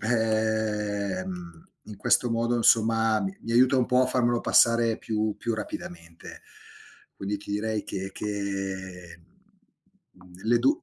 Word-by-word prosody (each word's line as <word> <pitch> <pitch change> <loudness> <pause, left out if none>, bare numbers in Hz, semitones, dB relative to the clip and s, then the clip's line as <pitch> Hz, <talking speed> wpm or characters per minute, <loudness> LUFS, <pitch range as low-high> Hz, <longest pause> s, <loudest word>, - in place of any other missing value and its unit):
ehm, 105 -6 -2 0.2
in 105 - -10
questo 120 +4 +2
modo 115 +1 0
insomma 115 -1 +3
m 95 -1 -3
mi 115 - -5
aiuta 130 +3 +5
un 125 - +2
po' 125 0 +3
a - - +2
farmelo 120 -2 +1
passare 115 -1 +4
più 110 -1 -2
più 115 - -2
rapidamente. 85 -5 -8 0.7
Quindi 100 +1 -3
ti 100 - -11
direi 105 +1 -1
che 95 0 -5
che, 95 -4 -5 0.9
mhmm, 90 0 -17
le 120 +2 +3
du 305 +4 +2
110 Hz, 135 wpm, -26 LUFS, 95-115 Hz, 0.9 s, aiuta